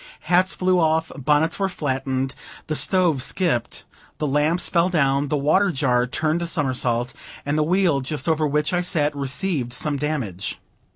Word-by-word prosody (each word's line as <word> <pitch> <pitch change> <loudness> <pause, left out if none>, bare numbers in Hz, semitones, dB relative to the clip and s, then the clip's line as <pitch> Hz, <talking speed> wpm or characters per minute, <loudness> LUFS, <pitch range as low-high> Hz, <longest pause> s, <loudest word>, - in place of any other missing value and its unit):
Hats 180 +4 +2
flew 185 0 +2
off, 160 0 +1
bonnets 150 +5 +1
were 195 -1 +1
flattened, 135 -4 -2 0.3
the 155 - -3
stove 175 -6 +2
skipped, 145 -5 -1 0.3
the 155 - -2
lamps 150 +5 +1
fell 170 +1 +2
down, 140 -4 +1
the 150 - 0
water 170 +8 +3
jar 125 -4 +1
turned 155 +6 -1
a 170 - -2
somersault, 125 -5 -1 0.3
and 145 +1 -1
the 155 - +2
wheel 170 -3 +2
just 145 +5 -4
over 160 -1 +2
which 150 +3 0
I 180 - +2
sat 155 -5 0
received 140 -1 -1
some 145 +3 -1
damage. 135 - -3
150 Hz, 165 wpm, -22 LUFS, 135-170 Hz, 0.3 s, water